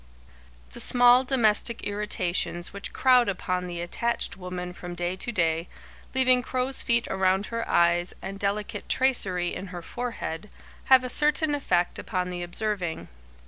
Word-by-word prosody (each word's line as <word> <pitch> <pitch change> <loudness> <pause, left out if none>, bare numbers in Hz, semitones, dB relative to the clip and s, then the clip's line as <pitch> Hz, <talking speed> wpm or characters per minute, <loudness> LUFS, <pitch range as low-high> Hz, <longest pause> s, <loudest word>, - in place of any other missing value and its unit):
The - - -9
small 245 +1 +6
domestic 235 -3 +1
irritations 185 -4 -2
which 200 - -6
crowd 250 -4 +4
upon 180 -1 -2
the 175 -1 -5
attached 235 +7 +1
woman 180 -1 -6
from 175 -1 -8
day 175 +1 -2
to 240 - -3
day, 165 -4 0 0.5
leaving 255 -1 +4
crow's 255 +2 -1
feet 235 -1 +1
around 190 +1 +1
her 230 0 -4
eyes 175 +1 +2
and 195 0 -7
delicate 205 +1 -2
tracery 190 -9 +1
in 195 - -6
her 175 -2 -8
forehead, 210 -5 -5 0.4
have 260 -1 +6
a - - -2
certain 300 +3 +1
effect 180 -11 0
upon 180 -1 -3
the 175 0 -5
observing. 180 -1 -3
200 Hz, 145 wpm, -26 LUFS, 180-245 Hz, 0.5 s, small